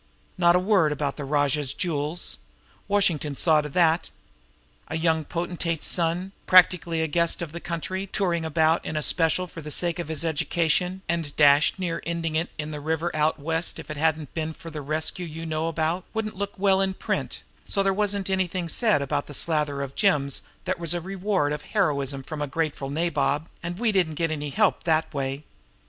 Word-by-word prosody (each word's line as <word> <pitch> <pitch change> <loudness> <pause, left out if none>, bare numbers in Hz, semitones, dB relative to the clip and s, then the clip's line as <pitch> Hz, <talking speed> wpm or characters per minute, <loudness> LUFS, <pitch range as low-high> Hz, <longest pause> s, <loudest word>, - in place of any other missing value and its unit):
Not 175 -1 +5
a - - +5
word 185 -5 +3
about 145 -1 -2
the 150 - -4
Rajah's 145 -1 +1
jewels. 160 0 -2 0.5
Washington 170 -8 +1
saw 155 +1 +4
to 150 - -6
that! 165 +1 +2 0.8
A 160 - -3
young 160 -1 +2
potentate's 170 0 -2
son, 175 +2 +1 0.2
practically 175 -3 +5
the 160 - +1
guest 170 +2 +1
of 170 -3 -5
the 170 - -6
country, 185 +3 -4
touring 175 -4 0
about 160 +1 +2
in 155 - -3
a 150 - 0
special 165 +3 +2
for 165 -2 -9
the 150 - -7
sake 170 +3 0
of 170 - -3
his 160 0 -1
education, 170 +4 0
and 165 -3 -2
dashed 145 +2 +5
near 175 -3 -2
'ending 165 -1 -2
it 165 +3 0
in 155 0 -4
the 150 - -5
river 160 +3 -2
out 155 +1 +2
West 165 +3 -1
if 160 -1 -8
it 150 - -5
hadn't 155 -2 0
been 160 -1 -3
for 165 +1 -10
the 150 -1 -5
rescue 155 +5 -1
you 165 +1 -7
know 160 0 -1
about, 165 +2 -1
wouldn't 215 -2 -2
look 200 +1 -4
well 190 0 +3
in 190 -1 0
print; - - -3 0.2
so 195 - +1
there 195 0 +2
wasn't 200 -1 0
anything 185 -2 -1
said 210 -3 +2
about 145 +1 -2
the 145 - -9
slather 150 -3 0
of 135 -1 -6
gems 145 -9 +2 0.2
that - - -1
was 170 -1 +1
the 175 - -2
reward 190 -4 0
of 150 - -4 0.2
heroism 140 -7 +1
from 155 +2 -6
a 145 - -1
grateful 145 -2 -2
nabob, 155 -1 0
and 175 +1 -5
we 230 +1 +1
didn't 175 -6 +1
get 165 +1 0
any 150 -1 -3
help 210 +5 +2
that 160 -1 +1
way. 135 0 -3
165 Hz, 195 wpm, -25 LUFS, 150-180 Hz, 0.8 s, Not